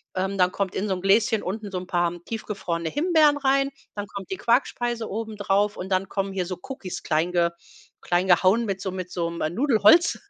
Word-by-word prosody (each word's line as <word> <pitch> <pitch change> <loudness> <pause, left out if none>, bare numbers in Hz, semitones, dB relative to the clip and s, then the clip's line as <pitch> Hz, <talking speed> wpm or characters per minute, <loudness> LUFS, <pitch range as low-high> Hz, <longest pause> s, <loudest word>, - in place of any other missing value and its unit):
Ähm, 190 +1 -1
dann 180 0 +4
kommt 195 -1 -2
in 205 - -2
so 190 - +1
'n 180 - -7
Gläschen 215 +3 +3
unten 205 +3 -4
so 185 - -3
'n 180 - -5
paar 175 -1 +1
tiefgefrorene 190 -7 -4
Himbeeren 310 - +3
rein, 275 0 +2 0.2
dann 205 0 -5
kommt 195 -2 -8
die 190 - -2
Quarkspeise 240 -1 0
obendrauf 205 -1 -1
und 185 - -6
dann 185 0 0
kommen 195 -1 -2
hier 185 -2 -2
so 185 -1 -5
Cookies 225 -9 -7
klein 160 +2 0
ge 170 -1 +2 0.5
klein 175 +1 0
gehauen 190 +5 +4
mit 195 -2 -3
so 190 - -3
mit 185 -1 -6
so 170 -2 -2
'nem 170 -1 -3
Nudelholz 290 - +4
195 Hz, 205 wpm, -24 LUFS, 180-225 Hz, 0.5 s, dann